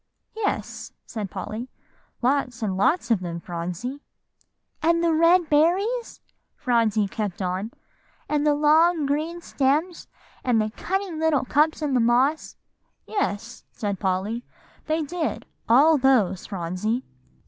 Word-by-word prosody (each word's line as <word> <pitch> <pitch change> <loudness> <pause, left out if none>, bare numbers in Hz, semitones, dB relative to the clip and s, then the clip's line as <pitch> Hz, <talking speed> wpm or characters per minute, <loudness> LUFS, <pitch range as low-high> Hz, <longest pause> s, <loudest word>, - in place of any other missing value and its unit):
"Yes," 440 -2 -3
said 210 -4 -5
Polly, 230 +7 -6 0.5
"lots 250 -3 0
and 195 -3 -1
lots 240 - +1
of 225 - +4
them, 170 -2 -5
Phronsie." 180 - -5 0.8
"And 335 +1 +2
the 335 -1 +3
red 335 +2 +4
berries?" 375 +11 +1 0.3
Phronsie 225 -4 +1
kept 200 -2 -4
on, 185 +3 -2 0.6
"and 295 -1 0
the 300 -1 +3
long 310 +2 +4
green 310 +5 -2
stems, 305 +4 0 0.4
and 245 -3 +2
the 215 0 0
cunning 380 - -3
little 310 -5 +2
cups 305 +4 +2
in 290 -2 0
the 255 - +3
moss." 250 +6 +2 0.5
"Yes," 235 - -3
said 200 -3 -3
Polly, 195 +5 -1 0.4
"they 315 0 0
did; 320 +2 -3 0.2
all 290 +6 +6
those, 245 -9 +2
Phronsie." 195 +6 -2
265 Hz, 125 wpm, -24 LUFS, 215-320 Hz, 0.8 s, all